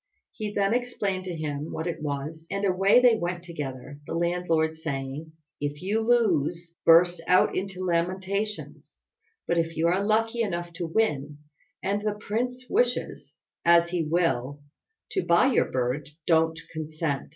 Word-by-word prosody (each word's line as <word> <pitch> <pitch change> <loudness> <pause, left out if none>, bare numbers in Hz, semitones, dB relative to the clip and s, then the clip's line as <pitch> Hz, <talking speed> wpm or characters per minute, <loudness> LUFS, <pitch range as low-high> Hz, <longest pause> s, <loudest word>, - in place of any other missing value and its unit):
He 210 -1 -4
then 200 +1 +1
explained 205 -6 -1
to 180 -2 -4
him 150 -1 -4
what 160 - -4
it 170 -3 -3
was, 155 +2 -4
and 200 0 -1
away 195 +4 +5
they 245 -2 +6
went 175 -2 -3
together, 145 -5 -7
the - - -3
landlord 170 -2 +1
saying, 150 0 -5 0.3
"If 145 +2 -4
you 205 +4 +1
lose, 175 -8 +1
burst 170 +1 +6
out 180 +1 +4
into 185 -1 -3
lamentations; 190 +4 -2 0.5
but 170 - +2
if 165 -1 -2
you 160 - +1
are 185 +3 +1
lucky 225 +3 +1
enough 175 -5 -2
to 175 - -3
win, 150 -7 0 0.5
and 200 +1 0
the 210 0 -1
prince 245 +5 -3
wishes, 485 +5 0 0.3
as 170 0 +5
he 175 -1 0
will, 150 -4 0 0.5
to 380 - 0
buy 210 +10 +4
your - - +4
bird, 130 +4 -1 0.2
don't 160 -1 +3
consent. 155 -2 -3
170 Hz, 150 wpm, -26 LUFS, 155-200 Hz, 0.5 s, they